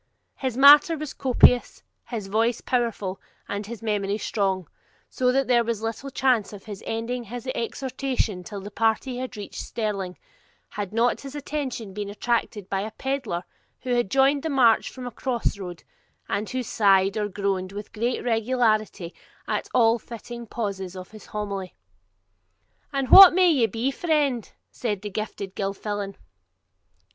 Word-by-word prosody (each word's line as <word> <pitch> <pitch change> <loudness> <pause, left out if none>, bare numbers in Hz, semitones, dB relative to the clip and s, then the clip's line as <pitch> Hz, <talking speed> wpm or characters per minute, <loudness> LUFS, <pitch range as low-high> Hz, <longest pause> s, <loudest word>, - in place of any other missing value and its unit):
His 260 -3 -3
matter 295 +4 +8
was 300 -2 -5
copious, 250 -1 +3 0.2
his 225 -5 -4
voice 225 +4 +1
powerful, 230 -6 -2 0.3
and 205 0 -4
his 230 0 -8
memory 205 -2 0
strong; 190 -5 -1 0.4
so 250 -1 +2
that 270 +1 +2
there 240 -2 +4
was 230 -2 -3
little 230 +5 -4
chance 255 -6 +1
of 200 - -10
his 210 -2 -8
ending 235 +2 -3
his 240 +3 -7
exhortation 250 -5 -2
till 205 0 -7
the 205 +2 -8
party 225 +4 0
had 255 -3 -5
reached 205 - -6
Stirling, 195 -5 -3 0.5
had 200 -2 -5
not 230 +2 +1
his 275 0 -9
attention 270 -8 -4
been 205 0 -4
attracted 210 -2 -2
by 195 -1 -1
a 215 - -4
pedlar 250 -8 -3 0.4
who 250 - -2
had 240 -5 +1
joined 275 +3 +3
the 320 - -3
march 250 -6 +4
from 255 -1 -9
a 245 - -5
cross 235 -4 -2
road, 180 -3 -7 0.4
and 205 +2 -2
who 255 -1 -2
sighed 195 -3 +3
or 210 -1 0
groaned 195 -1 -2
with 205 +1 -8
great 235 +3 -1
regularity 225 -6 0 0.3
at - - -2
all 230 -1 +4
fitting 235 +1 -9
pauses 195 -5 -4
of 185 0 -9
his 215 -1 -13
homily. 200 -3 -5 1.2
'And 275 -2 -1
what 380 -3 +11
may 365 -2 +5
ye 255 -7 +3
be, 235 +5 -1
friend?' 285 - 0 0.2
said 210 -5 -3
the 205 - -5
Gifted 200 -2 -5
Gilfillan. 200 0 -3
225 Hz, 155 wpm, -25 LUFS, 200-255 Hz, 1.2 s, what